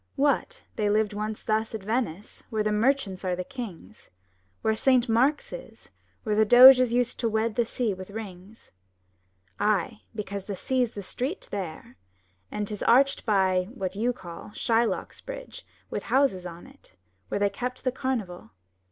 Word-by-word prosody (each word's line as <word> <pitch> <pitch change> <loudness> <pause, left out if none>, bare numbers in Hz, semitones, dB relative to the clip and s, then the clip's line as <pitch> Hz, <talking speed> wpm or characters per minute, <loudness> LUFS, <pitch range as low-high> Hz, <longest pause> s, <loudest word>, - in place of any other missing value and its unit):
What! 295 - 0
they 210 -1 +1
lived 210 0 +2
once 215 +1 -4
thus 220 +1 0
at 215 - -6
Venice 215 -4 -3
where 220 -3 0
the 215 - 0
merchants 210 -4 +1
were 180 -1 0
the 180 - -4
kings, 185 - -9 0.5
Where 220 - +3
Saint 255 +2 +3
Mark's 255 +6 +2
is, - - -11 0.3
where 215 - -1
the 220 - +5
Doges 250 +2 +9
used 245 0 0
to 230 - +1
wed 220 +1 0
the 235 +1 +1
sea 230 -2 -1
with 185 0 -9
rings? 200 0 -10 0.9
Ay, 210 +1 0
because 200 -2 -5
the 200 - -4
sea's 250 +3 0
the 200 - -5
street 260 - -4
there; 160 - -6 0.5
and 210 -1 -3
'tis 210 -1 -6
arched 270 +2 +3
by 190 -3 +2
— - - -13
what 190 -5 -4
you 230 +4 +1
call 175 -7 -10
— - - -19
Shylock's 230 0 0
bridge - - -9 0.2
with - - -2
houses 260 -10 +2
on 170 0 -10
it, 270 +1 -19 0.3
where 200 - -2
they 200 0 +2
kept 250 +1 -5
the 255 - +1
carnival. 235 - -4
220 Hz, 170 wpm, -27 LUFS, 200-250 Hz, 0.9 s, Doges